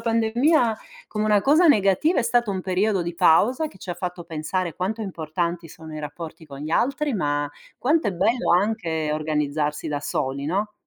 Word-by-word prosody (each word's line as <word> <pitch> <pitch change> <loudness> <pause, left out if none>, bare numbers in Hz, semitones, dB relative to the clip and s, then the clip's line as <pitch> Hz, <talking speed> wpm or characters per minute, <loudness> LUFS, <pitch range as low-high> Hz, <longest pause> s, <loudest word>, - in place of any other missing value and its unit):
pandemia 230 +2 +2 0.3
come 215 0 -2
una 210 -2 +3
cosa 310 +6 +5
negativa, 210 - +4
è - - 0
stato 240 -2 +1
un 190 -2 -3
periodo 190 0 +1
di 170 0 -4
pausa 200 - +4
che - - -17
ci 180 - -7
ha - - -2
fatto 175 0 -5
pensare 165 +1 -3
quanto 215 +5 -2
importanti 170 -1 -3
sono 160 0 -11
i 155 - -5
rapporti 155 +2 -8
con 140 -1 -10
gli 155 +2 -5
altri, 275 - +1
ma 145 -5 -1 0.3
quanto 305 +3 +2
è - - -1
bello 225 +8 +1
anche 175 -5 0
organizzarsi 150 -1 -1
da 145 -1 -2
soli, 140 0 -2
no? 205 +5 -1
185 Hz, 180 wpm, -24 LUFS, 155-220 Hz, 0.3 s, cosa